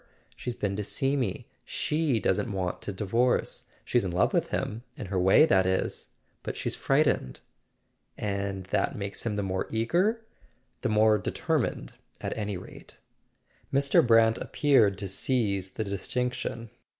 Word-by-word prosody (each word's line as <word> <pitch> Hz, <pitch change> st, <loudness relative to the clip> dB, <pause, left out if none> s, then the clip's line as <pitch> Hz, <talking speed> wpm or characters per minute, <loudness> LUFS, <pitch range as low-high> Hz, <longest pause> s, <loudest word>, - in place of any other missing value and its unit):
She's 125 Hz, -, -5 dB
been 100 Hz, -3 st, -2 dB
to 105 Hz, -, -2 dB
see 135 Hz, +7 st, 0 dB
me. 125 Hz, -9 st, -2 dB, 0.2 s
She 150 Hz, -6 st, 0 dB
doesn't 105 Hz, +1 st, 0 dB
want 95 Hz, -2 st, -3 dB
to -, -, -4 dB
divorce. 115 Hz, +6 st, 0 dB, 0.2 s
She's 120 Hz, -, +2 dB
in 95 Hz, -, -2 dB
love 90 Hz, +1 st, +1 dB
with -, -, +2 dB
him; 110 Hz, +2 st, -3 dB, 0.2 s
in -, -, -5 dB
her 95 Hz, -, +2 dB
way, 95 Hz, +11 st, +6 dB
that 95 Hz, -10 st, +3 dB
is; 95 Hz, 0 st, -1 dB, 0.3 s
but -, -, -5 dB
she's -, -, -2 dB
frightened." 65 Hz, -, +1 dB, 0.8 s
"And 100 Hz, -2 st, -3 dB
that -, -, +1 dB
makes 100 Hz, +2 st, -4 dB
him 105 Hz, -, -1 dB
the 100 Hz, -, -1 dB
more 95 Hz, -1 st, -2 dB
eager?" 185 Hz, -, +1 dB, 0.6 s
"The 125 Hz, -, 0 dB
more 110 Hz, 0 st, +4 dB
determined, 95 Hz, -, -2 dB, 0.3 s
at -, -, -4 dB
any 105 Hz, -3 st, -3 dB
rate." 90 Hz, -, -12 dB, 0.7 s
Mr. 140 Hz, 0 st, +4 dB
Brant 115 Hz, -1 st, +4 dB
appeared 120 Hz, -10 st, +3 dB
to 100 Hz, 0 st, -4 dB
seize 100 Hz, -2 st, 0 dB
the 110 Hz, -, -2 dB
distinction. 115 Hz, +3 st, -3 dB
105 Hz, 150 wpm, -28 LUFS, 95-125 Hz, 0.8 s, way